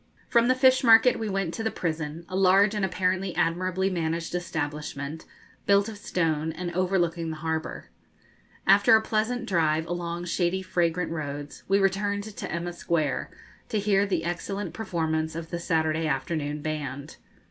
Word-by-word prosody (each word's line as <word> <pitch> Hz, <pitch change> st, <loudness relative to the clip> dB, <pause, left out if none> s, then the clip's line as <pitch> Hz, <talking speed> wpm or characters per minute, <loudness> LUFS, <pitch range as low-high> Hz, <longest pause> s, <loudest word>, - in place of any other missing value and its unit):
] -, -, -32 dB
From 235 Hz, 0 st, +4 dB
the 255 Hz, -, +4 dB
fish 260 Hz, 0 st, +4 dB
market 230 Hz, +1 st, +6 dB
we 220 Hz, -1 st, -2 dB
went 195 Hz, -4 st, -1 dB
to 225 Hz, -, -4 dB
the 220 Hz, -, +1 dB
prison, 160 Hz, -3 st, -4 dB
a 185 Hz, -, -6 dB
large 195 Hz, +2 st, +5 dB
and 210 Hz, -2 st, -1 dB
apparently 185 Hz, 0 st, 0 dB
admirably 185 Hz, +3 st, 0 dB
managed 165 Hz, -2 st, -2 dB
establishment, 150 Hz, -3 st, -4 dB, 0.4 s
built 200 Hz, +1 st, +4 dB
of 220 Hz, -, -6 dB
stone, 160 Hz, -6 st, -1 dB
and 175 Hz, +1 st, -5 dB
overlooking 175 Hz, -2 st, 0 dB
the 160 Hz, -, -4 dB
harbour. 160 Hz, 0 st, -4 dB, 0.7 s
After 200 Hz, +3 st, +6 dB
a 220 Hz, -, +4 dB
pleasant 225 Hz, +3 st, -1 dB
drive 160 Hz, -3 st, +2 dB
along 175 Hz, 0 st, -4 dB
shady 175 Hz, +2 st, 0 dB
fragrant 175 Hz, -2 st, 0 dB
roads, 145 Hz, -2 st, -5 dB
we 195 Hz, -, +4 dB
returned 200 Hz, +1 st, +1 dB
to 215 Hz, -1 st, -7 dB
Emma 175 Hz, +1 st, -3 dB
Square, 160 Hz, -4 st, -1 dB, 0.4 s
to 220 Hz, -, -1 dB
hear 200 Hz, -1 st, +2 dB
the 180 Hz, -4 st, -1 dB
excellent 185 Hz, +4 st, -3 dB
performance 160 Hz, -6 st, -2 dB
of 165 Hz, 0 st, -6 dB
the 170 Hz, -, -2 dB
Saturday 160 Hz, -1 st, 0 dB
afternoon 145 Hz, +1 st, -2 dB
band. 145 Hz, -2 st, -5 dB
175 Hz, 160 wpm, -26 LUFS, 160-195 Hz, 0.7 s, market